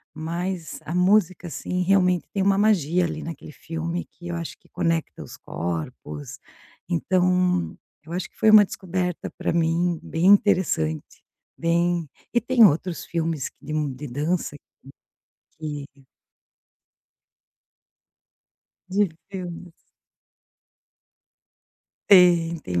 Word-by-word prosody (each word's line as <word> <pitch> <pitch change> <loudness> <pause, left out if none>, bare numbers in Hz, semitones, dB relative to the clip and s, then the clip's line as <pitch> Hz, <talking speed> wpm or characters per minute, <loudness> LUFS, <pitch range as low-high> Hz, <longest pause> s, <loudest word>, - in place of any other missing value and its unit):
mas 170 +1 -4
a 165 - -4
música, 185 -1 +2
assim, 180 +2 -3
realmente 180 -1 +3
tem 195 -2 0
uma 195 0 +4
magia 180 -5 +3
ali - - -4
naquele 160 -2 -8
filme 165 +4 -4
que 175 - -13
eu 170 - -3
acho 165 -1 -5
que - - -27
conecta 165 -1 -2
os - - -11
corpos. 80 -3 -6 0.5
Então, 180 0 +1 0.3
eu 165 - -8
acho 180 - -3
que - - -32
foi 215 - +5
uma 210 -1 +9
descoberta 180 -2 -3
pra - - -1
mim 170 +1 +1
bem 165 +2 -2
interessante, 185 - +2 0.3
bem 170 -1 +1 0.3
e 240 - +4
tem 245 -1 +4
outros 170 +1 +1
filmes 165 -4 -2
de 150 - -6
m 150 -3 -1
de 145 +3 -8
dança, 150 +4 -2
hum, - - -12 1.0
que 145 -3 -7 2.8
De 200 +1 +2 0.2
filmes. 180 -2 -7 2.4
Tem, 175 -3 +6
tem 90 - -2
170 Hz, 115 wpm, -24 LUFS, 160-180 Hz, 2.8 s, uma